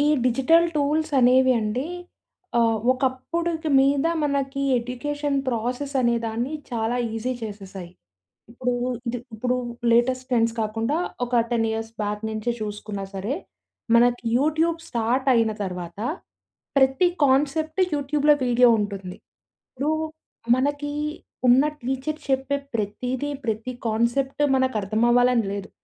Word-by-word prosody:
ఈ - - +3 0.2
digital 270 +7 +4
tools 305 +2 +1
అనేవి 260 +1 +5
అండి, 220 +6 -2 0.7
ఆ! - - +5 0.3
ఒకప్పుడుకి 315 +6 -2
మీద 275 +2 +3 0.2
మనకి 275 -1 -1 0.2
ఎడ్యుకేషన్ 285 +4 -3
ప్రాసెస్ 250 +4 -2
అనేదాన్ని 235 +2 0 0.2
చాలా 230 0 -1 0.2
ఈజీ 235 +3 -2
చేసేశాయి. 195 -4 -7 0.6
ఇప్పుడు, 250 +1 -2 0.3
ఇది 240 +1 -1 0.2
ఇప్పుడు 250 +3 0 0.3
లేటెస్ట్ 255 +2 +2
ట్రెండ్స్ 230 -2 +2
కాకుండా 225 +7 -1 0.3
ఒక 240 -1 +2
10 225 -1 +2
ఇయర్స్ 225 0 -4
బ్యాక్ 210 +1 -3
నుంచే 220 +2 -2
చూసుకున్నా 210 -1 -5
సరే. 200 +8 -2 0.6
మనకి 245 +1 +4
యూట్యూబ్ 315 +4 +1
స్టార్ట్ 245 +3 0
అయిన 225 -1 +3
తర్వాత, 180 -2 -6 0.8
ప్రతి 265 +6 +4 0.2
కాన్సెప్ట్ 310 +6 +1
యూట్యూబ్‌లో 290 +1 +3
వీడియో 245 0 +5
ఉంటుంది. 195 -3 -4 0.5
ఇప్పుడు 280 +4 -1 0.7
మనకి 290 +2 -1 0.6
ఉన్న 250 +3 +6 0.2
టీచర్ 265 +5 -2
చెప్పే 265 +1 +1 0.2
ప్రతీది, 245 +7 -2
ప్రతి 225 +3 -2
కాన్సెప్ట్ 240 +6 0
మనకు 260 -2 +1
అర్థం 215 +3 0
అవ్వాలని 245 -2 +4
లేదు. 200 0 -5
250 Hz, 115 wpm, -24 LUFS, 225-280 Hz, 0.8 s, ఉన్న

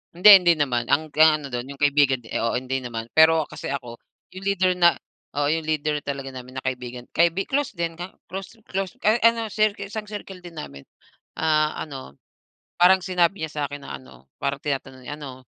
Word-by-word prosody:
Hindi, 180 +5 +3
hindi 180 -3 +5
naman, 120 -5 0
ang 155 +2 +2
ga 155 0 +5
ano 145 - -7
do'n, 125 +1 -5
yung 140 - -11
kaibigan 145 -2 +3
di 115 -2 -10
oo, 115 +2 0
hindi 130 +1 -3
naman. 115 -2 -5
Pero, 160 -1 +5
kasi - - -6
ako, 125 -4 -5 0.4
yung 190 - -8
leader 190 -2 +2
na 175 -1 +4 0.4
oo, 145 - +2
yung 160 +2 0
leader 150 -1 -1
talaga 140 -1 -5
namin 130 +1 -7
na - - -16
kaibigan, 125 -1 -5
kaibi 170 +3 +2
close 285 0 0
din, 170 -4 -3
ka 175 +2 -7 0.2
close 195 +4 -8
close 190 0 -3 0.2
a 215 - +6
ano 230 -1 +4
circle, 215 -1 0
isang 215 +2 -5
circle 195 -3 -8
din 170 -3 -9
namin. 70 - -9 0.6
Ah, 155 -1 +2
ano, 135 - -9 0.6
parang 185 +2 +6
sinabi 180 0 +1
niya 160 - -4
sa'kin 145 0 -5
na - - -5
ano, 65 0 -18
parang 140 0 -2
tinatanong 135 -2 -4
niya, 145 - -4
"Ano, 130 -3 -9
150 Hz, 195 wpm, -24 LUFS, 130-180 Hz, 0.6 s, a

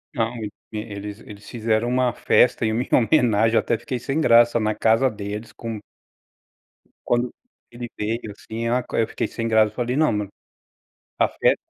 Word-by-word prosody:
Não, 115 0 -1 0.4
ele 105 -1 -6 0.2
eles 105 -1 -12
fizeram 115 0 0
uma 125 0 +1
festa 125 -1 +3
em 110 - +1
minha 120 +3 -1
homenagem, 115 -3 +3
até 115 - +1
fiquei 130 -3 -4
sem 135 +6 -2
graça 120 -4 +5
na 110 -1 0
casa 115 +4 +3
deles 105 0 -6
com 115 -2 -6 1.3
Quando 120 0 0 0.4
ele 120 0 -7
veio, 110 +1 -3
assim, 110 +3 -6
ah, 125 +1 +1
eu 115 - +2
fiquei - - -3
sem 115 -1 -4
graça, 110 -1 +4
eu - - -27
falei: 125 0 -1
"Não 155 +1 +3
mano 105 -2 -2 0.9
a - - +4
fe - - +2
115 Hz, 165 wpm, -23 LUFS, 110-120 Hz, 1.3 s, graça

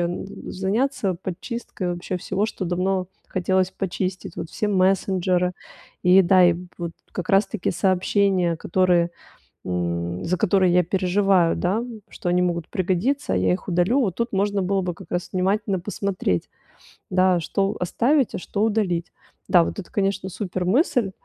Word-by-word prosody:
н 175 +2 -2 0.2
заняться 195 +1 0
подчисткой 185 +1 -5
вообще 175 +1 -4
всего, 195 +3 -1
что 200 - -5
давно 185 +1 0 0.2
хотелось 185 0 +1
почистить. 190 -1 -4
Вот 165 - -5
все 210 - -2
мессенджеры 185 -2 +2 0.5
и, 185 +1 +7
да, 185 +1 +5
и 175 -1 +5 0.2
вот 170 -1 -4 0.2
как 180 - -5
раз-таки 195 0 +2
сообщения, 185 -1 +2
которые, 175 0 +2 0.5
м, 85 0 -2
за 180 +2 0
которые 185 0 +3
я 180 - +5
переживаю, 185 -1 +2
да, 200 +6 0 0.3
что 175 - -5
они 180 +1 +3
могут 170 -2 -1
пригодиться, 190 - 0
а - - +2
я 90 0 +2
их 90 - -4
удалю. 180 +10 +2
Вот 195 -9 0
тут 235 -1 -2
можно 200 0 +1
было 195 +1 +1
бы 180 -1 -3
как 190 - -14
раз 175 0 -2
внимательно 195 +1 0
посмотреть, 190 - -2 0.6
да, 185 -1 +3
что 195 +4 -1
оставить, 245 - +1
а - - -2
что 200 +3 -3
удалить. 200 -6 0 0.4
Да, 175 -2 +6
вот - - -5
это, 185 - -7
конечно, 195 -1 0
супер 185 -1 -4
мысль. 245 - +2
185 Hz, 155 wpm, -23 LUFS, 175-195 Hz, 0.6 s, и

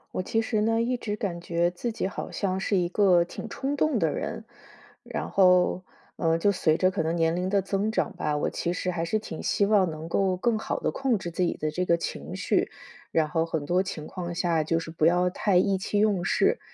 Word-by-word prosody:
我 - - 0
其 225 +4 0
实 220 -1 -1
呢， 225 +2 +2
一 245 +1 0
直 210 -3 -3
感 195 -5 -3
觉 170 0 0
自 180 +7 -4
己 220 - -2
好 195 - -4
像 190 -2 -1
是 200 - 0
一 175 -2 +1
个 185 -3 +4
挺 170 - -8
冲 280 +2 -3
动 305 -3 +2
的 165 -7 +1
人。 220 - -4 0.6
然 - - -4
后， 180 -1 +4 0.3
呃， 165 -1 +2
就 200 +5 +3
随 160 -5 +2
着 185 +3 +2
可 190 - -1
能 160 +1 -1
年 165 -1 +2
龄 180 +2 -1
的 200 0 +2
增 195 +2 -1
长 220 - 0
吧， 150 - -1
我 150 - 0
其 170 - -2
实 180 0 -2
还 170 -1 -2
是 195 +6 0
挺 165 -7 -7
希 200 - +1
望 200 -3 +3
能 160 +1 -7
够 190 +1 +1
更 220 +4 0
好 - - -3
地 - - 0
控 265 -4 0
制 175 -3 -6
自 180 - -1
己 175 - 0
的 155 0 -2
这 180 +4 -1
个 170 - +4
情 170 - -5
绪， - - +1 0.4
然 155 -2 +1
后 165 0 +1
很 160 -3 -3
多 180 +5 +2
情 175 -5 -5
况 175 0 -6
下 170 -3 +1
就 165 +1 +1
是 165 0 -7
不 160 -1 0
要 180 +2 +4
太 195 +1 0
意 190 +2 +3
气 205 +2 -2
用 205 -4 +2
事， - - +2
180 Hz, 260 characters per minute, -26 LUFS, 170-205 Hz, 0.6 s, 个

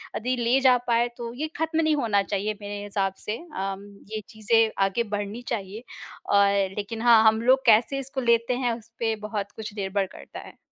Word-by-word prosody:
अदी 250 +3 -1
ले 240 +2 +2
जा 250 - +6
पाएँ 235 0 +3
तो 235 -1 -6
ये 295 +6 -3
खत्म 320 +1 0
नहीं 315 -1 +2
होना 225 -8 +1
चाहिए 205 +1 -2
मेरे 205 0 -6
हिसाब 195 -2 -1
से 215 +2 -2 0.2
अम, 195 +1 -4 0.3
ये 215 - -3
चीज़ें 220 +1 +2
आगे 195 +5 0
बढ़नी 205 +3 -4
चाहिए 210 0 -4 0.4
और 200 -1 +2
लेकिन 215 +2 -4
हाँ, 230 -2 +6
हम 220 +1 +4
लोग 260 +2 +3
कैसे 235 +5 +4
इसको 270 0 -4
लेते 235 0 +2
हैं 240 - +2
उसपे 230 0 -3
बहुत 205 -1 -4
कुछ 220 -2 -7
निर्भर 195 0 -1
करता - - -10
है। - - -15
225 Hz, 190 wpm, -25 LUFS, 205-240 Hz, 0.4 s, जा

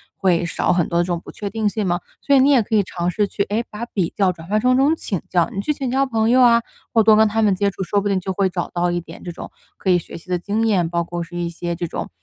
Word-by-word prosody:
会 175 -3 +1
少 - - 0
很 175 -2 +2
多 170 0 0
的 - - +3
这 - - -6
种 175 -1 -1
不 - - -12
确 205 -1 -5
定 220 0 -1
性 205 0 -1
嘛。 175 0 0 0.2
所 280 - +1
以 - - +6
你 270 +2 +5
也 260 -4 +5
可 220 +1 -2
以 205 - +4
尝 175 -1 -3
试 210 +1 0
去， 200 - -1
哎， 215 +4 -2
把 215 +3 -6
比 185 -8 -2
较 195 -2 +3
转 165 -1 -12
换 210 +2 +1
成 255 0 +3
这 265 - +3
种 310 +3 +3
请 195 - -4
教， 175 -2 +2
你 195 - -4
去 300 - 0
请 270 -2 -4
教 270 +1 +2
朋 225 -3 0
友 255 +1 +5
啊， 235 -1 +6 0.3
或 225 -2 +5
多 215 0 +6
跟 220 - +5
他 220 +1 0
们 205 -3 +3
接 200 +2 +1
触， 190 - -5
说 200 +3 0
不 205 - -2
定 195 -2 +1
就 190 +1 -4
会 190 0 +1
找 175 -1 -3
到 175 0 +1
一 175 - -1
点 - - -12
这 175 - -5
种 170 - -9 0.3
可 190 - -3
以 180 - +5
学 - - -8
习 175 +2 -16
的 180 - +1
经 215 +5 -1
验， 180 -6 +2
包 170 0 -1
括 175 +1 -5
是 175 +1 -11
一 170 -1 -2
些 170 0 -4
这 175 +1 -3
种 - - -5
195 Hz, 350 characters per minute, -20 LUFS, 175-220 Hz, 0.3 s, 以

